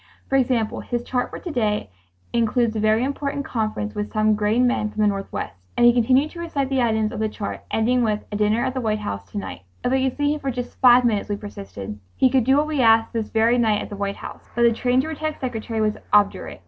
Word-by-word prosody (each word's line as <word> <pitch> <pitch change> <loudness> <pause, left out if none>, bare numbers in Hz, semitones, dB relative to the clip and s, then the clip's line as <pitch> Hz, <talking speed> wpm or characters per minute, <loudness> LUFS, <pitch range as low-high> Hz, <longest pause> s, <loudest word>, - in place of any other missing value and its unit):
"For 270 - +1
example, 245 -3 +1
his 240 -1 -3
chart 250 0 -1
for - - -7
to 350 - -6
day 210 - -1 0.4
includes 235 0 +1
a - - -1
very 215 +2 +3
important 280 +1 -2
conference 215 -2 -2
with 210 0 -4
some 215 0 +2
grain 215 +4 +2
men 245 -4 +1
from 215 0 -1
the - - +4
Northwest,"... 195 - -4
and 240 - +5
he 240 - +7
continued 255 +5 +3
to 340 - -10
recite 285 -6 -2
the 265 -1 +1
items 220 -2 +1
of 245 - -5
the 220 0 0
chart, 205 -1 -5
ending 245 +3 +2
with 215 -3 0
"a - - -3
dinner 215 +4 +1
at 260 - -1
the 260 - -2
White 215 -2 0
House 100 - -5
to - - -7
night." 95 -3 -5 0.2
"If 250 - 0
we 265 0 +2
could - - -13
see 290 0 +1
him 300 - -4
for 275 - -3
just 245 -1 -6
five 250 -1 +7
minutes," 215 -3 0
we 205 - 0
persisted, 195 - -8 0.2
"he 260 -1 +4
could 260 -3 +3
do 265 +2 +4
what 295 - +3
we 305 -3 -1
ask 225 -1 +4
this 225 -2 -3
very 230 +2 +3
night 215 -3 +2
at - - -9
the 205 - -6
White 200 0 -3
House." - - -10
But 235 - +2
the 235 - +6
trained 250 +3 +1
to - - -4
protect 310 -1 -4
secretary 225 -3 -3
was 215 0 0
obdurate. 205 -1 +2
230 Hz, 255 wpm, -22 LUFS, 215-255 Hz, 0.4 s, he